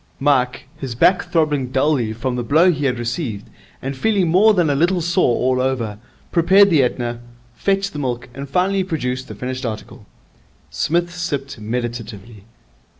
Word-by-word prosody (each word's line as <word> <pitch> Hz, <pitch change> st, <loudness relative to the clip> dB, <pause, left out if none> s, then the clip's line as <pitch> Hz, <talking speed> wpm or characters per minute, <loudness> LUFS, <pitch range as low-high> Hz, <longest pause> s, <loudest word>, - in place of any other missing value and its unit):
Mike, 130 Hz, -3 st, +1 dB
his 130 Hz, -4 st, -5 dB
back 185 Hz, +10 st, +3 dB
throbbing 150 Hz, -5 st, +1 dB
dully 130 Hz, -3 st, +1 dB
from 125 Hz, +3 st, -3 dB
the 125 Hz, -, -1 dB
blow 160 Hz, +9 st, +4 dB
he 145 Hz, -3 st, -2 dB
had 125 Hz, -2 st, +1 dB
received, 120 Hz, -3 st, -4 dB, 0.4 s
and 135 Hz, +1 st, -3 dB
feeling 195 Hz, +4 st, +1 dB
more 190 Hz, +7 st, +5 dB
than 175 Hz, -4 st, +2 dB
a 145 Hz, -, +2 dB
little 175 Hz, +5 st, +2 dB
sore 170 Hz, -6 st, +2 dB
all 130 Hz, +1 st, +1 dB
over, 120 Hz, -6 st, -2 dB, 0.3 s
prepared 190 Hz, +3 st, +5 dB
the 155 Hz, -4 st, +5 dB
Etna, 120 Hz, -1 st, -1 dB, 0.3 s
fetched 195 Hz, +6 st, -1 dB
the 150 Hz, -, -5 dB
milk, 125 Hz, -3 st, -3 dB
and 140 Hz, +1 st, -7 dB
finally 190 Hz, +5 st, +1 dB
produced 130 Hz, -8 st, -3 dB
the -, -, -8 dB
finished 130 Hz, +1 st, -5 dB
article. 110 Hz, -3 st, -6 dB, 0.6 s
Psmith 170 Hz, -, 0 dB
sipped 145 Hz, -8 st, -4 dB
meditatively. 115 Hz, -2 st, -5 dB
135 Hz, 160 wpm, -20 LUFS, 120-170 Hz, 0.6 s, more